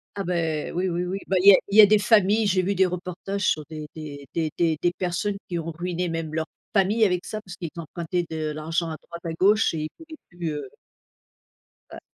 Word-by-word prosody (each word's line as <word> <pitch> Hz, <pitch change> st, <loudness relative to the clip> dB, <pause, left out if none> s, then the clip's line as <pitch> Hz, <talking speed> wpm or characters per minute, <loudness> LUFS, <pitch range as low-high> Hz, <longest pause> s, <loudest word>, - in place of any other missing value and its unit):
Ah 200 Hz, -, -2 dB
bah, 180 Hz, -, -2 dB, 0.4 s
oui, 180 Hz, +2 st, 0 dB
oui, 175 Hz, +1 st, -1 dB
oui 190 Hz, +2 st, -3 dB
bah 190 Hz, -, 0 dB
il 200 Hz, -, +8 dB
y -, -, +11 dB
a -, -, +7 dB
il 205 Hz, -, +1 dB
y -, -, +13 dB
a -, -, +10 dB
des 210 Hz, +1 st, +4 dB
familles, 210 Hz, 0 st, +4 dB
j'ai 185 Hz, -1 st, +2 dB
vu 200 Hz, +2 st, 0 dB
des 190 Hz, 0 st, +4 dB
reportages 180 Hz, +2 st, -4 dB
sur 155 Hz, -, +1 dB
des 155 Hz, -1 st, -7 dB
des 145 Hz, -3 st, -8 dB
des 160 Hz, -2 st, -1 dB
des 165 Hz, -3 st, +2 dB
des 175 Hz, -, +2 dB
personnes 190 Hz, +3 st, -2 dB
qui 175 Hz, -2 st, -2 dB
ont 165 Hz, +1 st, -4 dB
ruiné 175 Hz, +1 st, -3 dB
même 165 Hz, -1 st, -4 dB
leur 160 Hz, 0 st, -1 dB, 0.3 s
famille 210 Hz, +3 st, +3 dB
avec 180 Hz, -2 st, 0 dB
ça 215 Hz, -, -4 dB
parce 185 Hz, -3 st, -10 dB
qu'ils 170 Hz, -3 st, -5 dB
empruntaient 170 Hz, +2 st, -3 dB
de 155 Hz, -1 st, -3 dB
l'argent 165 Hz, +2 st, -2 dB
à 155 Hz, -, -5 dB
droite 170 Hz, 0 st, -11 dB
à 165 Hz, -, -2 dB
gauche 205 Hz, +3 st, +3 dB
et 155 Hz, -, -2 dB
ils 155 Hz, -, -4 dB
pouvaient 320 Hz, -1 st, -12 dB
plus, 175 Hz, -3 st, -4 dB
heu 145 Hz, -3 st, -6 dB, 1.2 s
Ouais. -, -, -8 dB
175 Hz, 235 wpm, -25 LUFS, 160-195 Hz, 1.2 s, y